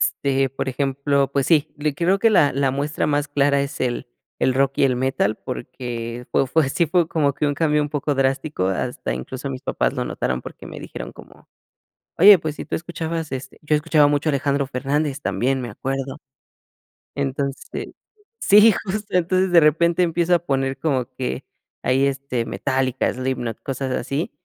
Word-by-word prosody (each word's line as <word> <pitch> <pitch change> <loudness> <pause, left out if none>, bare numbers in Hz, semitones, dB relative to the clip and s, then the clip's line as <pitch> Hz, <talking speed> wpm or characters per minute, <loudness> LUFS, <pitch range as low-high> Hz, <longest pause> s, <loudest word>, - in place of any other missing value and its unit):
Este, 135 -1 +1
por 135 +1 -4
ejemplo, 140 +1 0
pues 140 -1 +1
sí, 155 -2 +3
le 150 0 -1
creo 180 +6 +2
que 225 +1 +4
la 145 -8 +4
la 135 0 +1
muestra 145 +3 -1
más 145 0 0
clara 140 0 +2
es 140 0 -4
el 125 -1 -2 0.3
el 130 - +2
rock 135 0 +2
y - - +5
el 130 -2 +2
metal. 125 -4 0
Porque 120 -1 -6
fue 135 - +2
fue 150 +3 +2
así 165 +5 +1
fue 170 0 +2
como 145 -4 +1
que 150 - 0
un 145 - 0
cambio 150 0 +2
un 145 - -2
poco 145 0 -1
drástico, 135 - 0
hasta 95 - -2
incluso, 130 - -5
mis 130 -1 -6
papás - - 0
lo - - -2
notaron 65 0 -2
porque, - - -10
me - - -9
dijeron - - -7
como: - - -16 0.7
"Oye, 200 +2 +9
pues 155 -2 -4
si - - -6
tú - - -3
escuchabas", 165 -1 -4
este, 130 0 -6
yo 150 0 +1
escuchaba 150 -1 +4
mucho 145 +2 +1
a - - +4
Alejandro 140 0 0
Fernández 140 +2 -1
también, 125 +6 0
me 120 -2 -5
acuerdo. 135 +1 -4 1.0
Entonces, 140 0 -3 0.5
sí, 210 +2 +7
justo 205 +2 -4
entonces 185 +2 +1
de 175 - +8
repente 170 +3 +3
empiezo 175 +1 +2
a - - +2
poner 135 -4 -1
como 130 -4 -1
que 125 -1 -3 0.4
ahí, 135 +2 +3
este, 135 -3 -2
Metallica, 130 0 0
Slipknot, 125 -3 -3
cosas 135 -1 -3
así. 140 +5 -2
140 Hz, 180 wpm, -22 LUFS, 130-155 Hz, 1.0 s, Oye